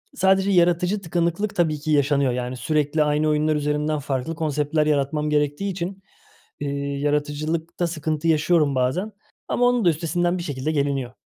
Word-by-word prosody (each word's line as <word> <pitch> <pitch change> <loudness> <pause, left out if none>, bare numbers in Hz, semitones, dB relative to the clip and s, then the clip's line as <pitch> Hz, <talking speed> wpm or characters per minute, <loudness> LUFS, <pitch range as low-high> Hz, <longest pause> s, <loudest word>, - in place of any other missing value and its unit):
sadece 190 +1 +3
yaratıcı 180 +2 +2
tıkanıklık 175 +3 -1
tabii 155 -4 +1
ki 155 +1 -3
yaşanıyor. 140 -2 +2
Yani 125 +1 -4
sürekli 150 +1 +1
aynı 150 +1 +1
oyunlar 150 0 +2
üzerinden 150 +1 -1
farklı 135 +3 -3
konseptler 150 -1 0
yaratmam 150 +1 0
gerektiği 150 +6 0
için, 190 +2 -5 0.6
eee, 145 - -3 0.3
yaratıcılıkta 150 +4 -1
sıkıntı 155 -1 -2
yaşıyorum 155 -2 +3
bazen 145 +12 0 0.4
ama 245 - +1
onun 245 -4 +2
da - - +6
üstesinden 175 +3 0
bir 175 - -4
şekilde 145 -1 -3
geliniyor. 140 -4 -1
155 Hz, 150 wpm, -23 LUFS, 145-175 Hz, 0.6 s, da